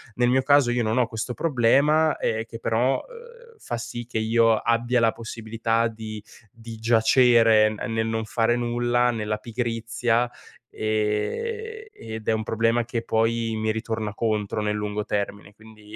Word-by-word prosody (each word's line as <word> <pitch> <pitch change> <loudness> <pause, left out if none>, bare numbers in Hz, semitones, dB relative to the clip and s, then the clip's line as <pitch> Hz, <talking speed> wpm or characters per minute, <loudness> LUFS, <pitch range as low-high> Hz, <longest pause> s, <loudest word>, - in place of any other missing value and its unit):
nel 120 0 +2
mio 130 +1 +3
caso, 145 -3 +4
io 120 0 0
non 110 +2 0
ho 125 -2 +3
questo 115 +2 -4
problema, 150 +2 +2
ehm, 110 0 -1
che, 115 0 -10
però, 120 +5 +1
uhm, 475 -1 -15
fa 120 - -5
sì 120 0 -6
che 115 -1 -5
io 115 0 +3
abbia 120 +2 +1
la 115 -1 +3
possibilità 115 0 -2
di 110 -1 -7 0.3
di 115 0 -10
giacere, 115 -1 +4
ehm 110 +2 -4
nel 110 0 0
non 115 0 -2
fare 115 +1 +1
nulla, 120 0 +1
nella 105 -2 -2
pigrizia, 115 +1 -1 0.4
ehm, 430 - -2
ed 110 -1 -8
è - - +3
un 110 0 -1
problema 115 +2 +1
che 115 0 -3
poi 115 0 0
mi 110 0 0
ritorna 110 -1 -3
contro, 110 -1 -1
nel 105 0 -1
lungo 105 0 -3
termine. 100 0 -4
Quindi, 110 0 -15
115 Hz, 160 wpm, -24 LUFS, 110-120 Hz, 0.4 s, caso